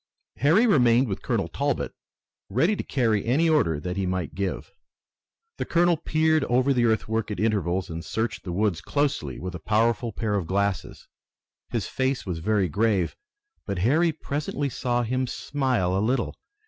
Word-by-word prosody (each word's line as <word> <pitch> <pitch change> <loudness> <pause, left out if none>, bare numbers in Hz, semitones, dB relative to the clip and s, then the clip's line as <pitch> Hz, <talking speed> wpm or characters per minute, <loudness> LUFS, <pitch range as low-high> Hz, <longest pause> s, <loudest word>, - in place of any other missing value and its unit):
Harry 160 - +4
remained 125 - +4
with 95 - -4
Colonel - - -1
Talbot, - - -2 0.6
ready 160 - +2
to - - -3
carry 115 -6 +1
any 140 +8 +2
order 140 - +2
that 90 +4 -4
he 95 -1 0
might 90 -6 -2
give. 95 +2 -3 0.9
The - - -2
colonel 175 0 +3
peered 155 -1 +1
over 130 +3 +2
the 120 -2 +2
earthwork 110 0 0
at 105 - -4
intervals 95 -4 0
and 85 -2 -6
searched 110 +4 -3
the 90 - -5
woods 95 -2 0
closely 145 +6 -1
with 90 -1 -5
a 90 - -6
powerful 115 +5 +1
pair 110 0 -2
of 95 -5 -1
glasses. 100 +1 -2 0.6
His - - -2
face 130 0 -1
was 90 -4 -3
very 100 +2 +1
grave, 100 +1 +1 0.5
but 100 -2 -2
Harry 160 +7 +3
presently 145 -1 -3
saw 120 0 -1
him 130 +2 -1
smile 125 -11 -1
a 95 - +1
little. 120 +3 0
115 Hz, 165 wpm, -25 LUFS, 95-135 Hz, 0.9 s, Harry